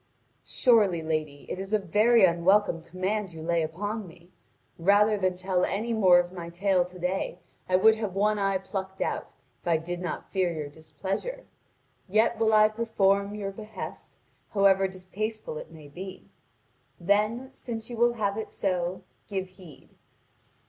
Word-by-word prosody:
"Surely, 205 - +3
lady, 155 -3 -3
it - - -5
is 195 +2 -5
a - - +6
very 210 +3 +4
unwelcome 175 +1 +3
command 185 +3 -3
you 160 -1 -8
lay 170 0 +1
upon 205 +6 -3
me. 170 +1 -17 0.5
Rather 205 +4 +4
than 185 -2 0
tell 185 -1 0
any 225 +4 -1
more 190 -5 +6
of 175 0 +1
my 170 -2 -7
tale 185 +1 +2
to 180 +1 -11
day, 180 +2 -2 0.3
I 185 - +3
would 220 +4 +6
have 210 -4 -4
one 210 +1 +2
eye 195 -1 +2
plucked 190 0 -6
out, - - -3 0.3
if - - -12
I 165 -2 +4
did 175 +2 -5
not 180 - -5
fear 185 -3 +1
your 155 -3 -5
displeasure. 190 - -5 0.6
Yet 220 +3 +2
will 220 -1 +3
I 215 0 +7
perform 205 -2 +1
your 200 -2 -4
behest, 215 +2 -8 0.4
however 195 -1 +5
distasteful 190 -1 -5
it - - -10
may 155 -3 -13
be. 185 +6 -9 0.7
Then 215 +8 +1
since 225 -4 -6
you - - -4
will 240 +1 +4
have 205 -2 -1
it 220 - -6
so, 185 -1 -2 0.2
give 190 -3 -3
heed. 185 -6 -15
190 Hz, 160 wpm, -27 LUFS, 175-215 Hz, 0.7 s, I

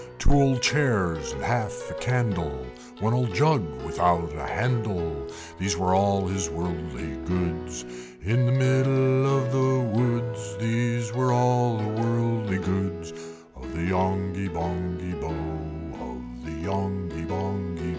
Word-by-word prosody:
Two 140 - +2
old 135 -3 +5
chairs, 100 - +2
and - - -6
half - - -1
a - - -5
candle, 95 - -1 0.4
One 110 +2 +2
old 125 -2 +1
jug 150 0 +5 0.2
without 85 -3 +2
a 75 0 -5
handle, 100 -10 -1 0.3
These 95 -2 0
were 90 +1 +2
all 100 0 +3
his 95 -2 -1
worldly 85 +1 -4
goods: 80 -9 -2 0.4
In 120 +7 +3
the - - +3
middle 130 0 +4
of 135 0 0
the 130 0 +3 0.2
woods, 120 -5 -1
These 120 +2 0
were 130 0 +2
all 125 -1 +3
the 110 +1 -1
worldly 115 -4 +1
goods 90 -3 -2 0.4
Of 65 +2 -10
the 85 - -2
Yonghy 95 +1 0
Bonghy 90 +1 -3
Bò, 80 -1 -5 0.3
Of - - -9
the 80 0 -6
Yonghy 95 -4 -3
Bonghy 85 0 -3
Bò. - - -2
100 Hz, 135 wpm, -26 LUFS, 85-120 Hz, 0.4 s, old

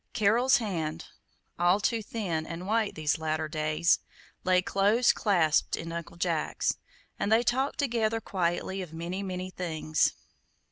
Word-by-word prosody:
Carol's 235 +4 +4
hand 165 -8 -3 0.5
(all 175 +3 +4
too 225 +2 0
thin 185 -8 -3
and 170 +2 -6
white 215 +1 0
these 155 0 0
latter 155 0 -1
days) 155 +2 +2 0.4
lay 185 0 +4
close 205 +6 +3
clasped 170 -7 +2
in 165 0 -6
Uncle 170 0 -6
Jack's, 170 -3 0 0.4
and 205 - 0
they 225 +2 +5
talked 265 +4 0
together 230 -5 +1
quietly 190 -1 -2
of 175 -4 -8
many, 170 +4 -4
many 185 -1 -4
things. 160 -4 0
185 Hz, 140 wpm, -29 LUFS, 165-215 Hz, 0.5 s, they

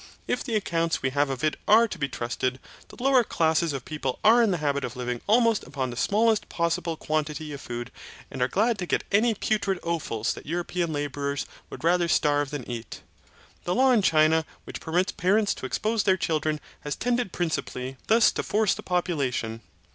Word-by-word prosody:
If - - -1
the 235 -5 -2
accounts 165 -7 0
we 130 - +1
have 145 +1 +1
of 135 0 -4
it 155 - +1
are 225 +2 +6
to - - -7
be 140 -1 -1
trusted, 125 +1 -2 0.3
the - - -14
lower 265 -2 +5
classes 160 -4 +1
of 135 -3 -5
people 140 -4 -3
are 230 +3 +7
in 230 - +3
the 180 - +1
habit 140 -2 -1
of 125 - -4
living 125 -1 -3
almost 230 0 +3
upon 130 -2 -3
the - - -7
smallest 215 - +2
possible 170 -1 -1
quantity 155 0 -2
of 140 - -7
food 120 0 -6 0.4
and 130 - -6
are 125 - +3
glad 215 - +1
to 180 - -3
get - - 0
any 220 +3 +3
putrid 200 -2 0
offals 155 -10 -1
that - - -11
European 175 +1 -2
labourers 145 -1 -2 0.2
would - - -9
rather 175 +1 +3
starve 145 -3 +2
than 145 -4 -6
eat. 120 -2 -7 0.6
The 175 - 0
law 260 +1 +5
in 235 -4 +4
China 160 -2 +4 0.2
which - - -8
permits 180 +4 0
parents 200 +3 +2
to 130 - -6
expose 220 - 0
their 190 -2 +3
children 155 -3 -1 0.2
has 145 -2 -4
tended 245 -4 -1
principally 135 -6 -3
thus 225 +1 +5
to - - -2
force 215 -2 +1
the - - -7
population. 140 -11 -1
160 Hz, 195 wpm, -26 LUFS, 140-205 Hz, 0.6 s, are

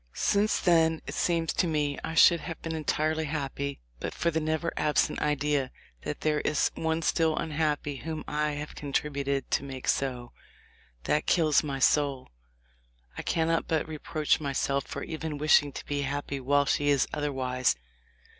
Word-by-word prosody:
Since 205 +1 +2
then 165 -2 +3
it - - -6
seems 165 -2 0
to 180 - +1
me 150 -3 0
I 160 - -4
should 170 0 +7
have 165 0 -6
been 165 - -3
entirely 155 0 0
happy 140 -1 -3 0.2
but - - -5
for 170 - +1
the 160 - 0
never 160 +2 -1
absent 150 -1 +1
idea 145 -2 0 0.3
that - - -5
there 150 -1 +1
is 150 - +1
one 160 0 -1
still 160 -1 +2
unhappy 150 -2 -1
whom 160 +2 -5
I 150 0 0
have 150 +1 -6
contributed 140 -1 -2
to - - +1
make 135 -2 -7
so. 125 -3 -1 0.7
That 150 - 0
kills 155 -4 +4
my 140 -2 -3
soul. 135 -1 +2 0.9
I - - -4
cannot 165 0 0
but 160 -2 0
reproach 155 0 0
myself 140 -1 -1
for - - -5
even 160 -2 -4
wishing 145 -1 +4
to - - -8
be 145 -1 -2
happy 140 0 -3
while 140 +2 +2
she 145 +1 +1
is 140 -2 +3
otherwise. 130 - 0
150 Hz, 165 wpm, -28 LUFS, 140-160 Hz, 0.9 s, should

